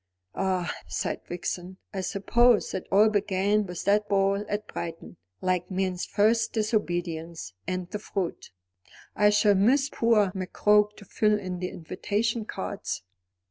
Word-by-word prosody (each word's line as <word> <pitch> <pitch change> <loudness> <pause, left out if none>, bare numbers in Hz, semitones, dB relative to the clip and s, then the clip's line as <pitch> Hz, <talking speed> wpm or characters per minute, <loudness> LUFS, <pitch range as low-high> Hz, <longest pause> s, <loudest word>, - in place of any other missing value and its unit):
"Ah," 185 -2 -1
sighed - - -3
Vixen, 180 +1 -4 0.2
"I 195 - -2
suppose 230 +5 +3
it 190 - -4
all 205 +3 +6
began 205 0 +1
with 180 -1 -5
that 210 +1 +2
ball 200 0 +2
at 210 +1 -2
Brighton, 165 - -7 0.2
like 185 -1 0
'Man's 185 -1 -1
first 225 +2 +2
disobedience, 175 - -2
and 185 -1 -2
the 210 - -3
fruit 195 -4 -4 0.4
'" - - -30 0.3
"I 210 0 +5
shall 210 0 +4
miss 260 +8 +3
poor 215 -4 +3
McCroke 210 +2 +2
to 205 - -12
fill 210 +2 +2
in 185 -3 -5
the 180 0 -2
invitation 210 +6 -2
cards." 195 - -4
200 Hz, 140 wpm, -27 LUFS, 185-210 Hz, 0.4 s, all